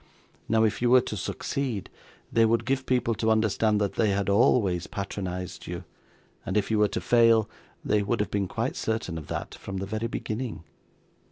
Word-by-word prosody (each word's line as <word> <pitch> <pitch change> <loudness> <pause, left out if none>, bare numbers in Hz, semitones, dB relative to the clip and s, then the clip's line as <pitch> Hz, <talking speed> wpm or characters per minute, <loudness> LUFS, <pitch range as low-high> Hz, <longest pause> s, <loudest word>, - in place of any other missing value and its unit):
Now, 110 0 +4
if 110 +1 +1
you 120 - +3
were 125 +1 +7
to 110 - -5
succeed, 105 - -3 0.5
they 115 - +5
would 115 +1 +2
give 130 +1 -1
people 125 -2 +2
to 110 +1 0
understand 110 -1 +2
that 100 -2 0
they 110 - +3
had 100 0 0
always 100 -5 +3
patronised 90 -2 -5
you; - - -5 0.6
and 95 - -1
if 105 +1 0
you 110 - +2
were 105 - +5
to - - -3
fail, 115 -2 +4 0.4
they 105 - +2
would 110 +4 -1
have 105 - -1
been 100 -2 0
quite - - -2
certain 110 -6 -2
of 75 - -11
that - - -4
from 95 -1 -7
the 95 - -3
very 110 +3 -2
beginning. 115 -3 -4
110 Hz, 190 wpm, -27 LUFS, 100-115 Hz, 0.6 s, were